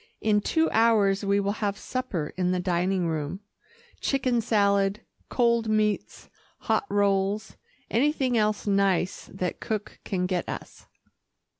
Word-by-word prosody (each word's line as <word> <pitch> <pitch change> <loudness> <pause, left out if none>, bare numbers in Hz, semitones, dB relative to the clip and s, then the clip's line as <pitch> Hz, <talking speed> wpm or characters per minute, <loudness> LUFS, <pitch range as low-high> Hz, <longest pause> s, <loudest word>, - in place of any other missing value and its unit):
In 210 -1 +2
two 320 +9 +2
hours 215 -3 +3
we 200 0 +2
will 200 +2 -2
have 200 -1 0
supper 205 -14 -4
in 180 -1 0
the 185 - 0
dining 180 0 0
room 160 +3 -3 0.6
chicken 255 -3 +1
salad, 200 -2 +2 0.3
cold 235 -2 +2
meats, 215 -1 0 0.3
hot 405 - 0
rolls, 200 +1 +1 0.3
anything 265 0 +1
else 215 -2 +1
nice 195 -3 +1
that 185 -2 -3
cook 215 -2 -4
can 180 -2 -1
get 180 -1 -2
us." - - -8
200 Hz, 130 wpm, -26 LUFS, 190-220 Hz, 0.6 s, hours